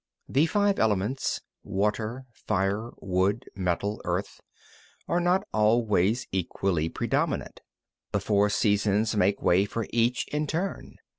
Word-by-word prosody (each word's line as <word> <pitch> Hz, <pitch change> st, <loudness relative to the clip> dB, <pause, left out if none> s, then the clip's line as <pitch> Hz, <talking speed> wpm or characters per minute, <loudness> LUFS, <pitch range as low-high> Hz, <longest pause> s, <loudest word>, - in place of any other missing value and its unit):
34. -, -, -11 dB
The 145 Hz, +4 st, +5 dB
five 205 Hz, +2 st, +2 dB
elements 110 Hz, +4 st, 0 dB, 0.2 s
(water, 110 Hz, +5 st, -1 dB
fire, 105 Hz, 0 st, -1 dB
wood, 95 Hz, +5 st, 0 dB
metal, 95 Hz, +2 st, -1 dB
earth) -, -, -3 dB, 0.7 s
are 175 Hz, -, +1 dB
not 180 Hz, +2 st, +2 dB
always 110 Hz, 0 st, +2 dB
equally 90 Hz, -3 st, -1 dB
predominant; -, -, -1 dB, 0.5 s
the 100 Hz, -, +1 dB
four 100 Hz, +1 st, +2 dB
seasons 105 Hz, +1 st, +2 dB
make 100 Hz, 0 st, +2 dB
way 90 Hz, +3 st, +4 dB
for 115 Hz, +2 st, -3 dB
each 120 Hz, +1 st, +1 dB
other 150 Hz, -, -1 dB
in 150 Hz, 0 st, -1 dB
turn. 175 Hz, +7 st, -3 dB
105 Hz, 130 wpm, -27 LUFS, 100-120 Hz, 0.7 s, The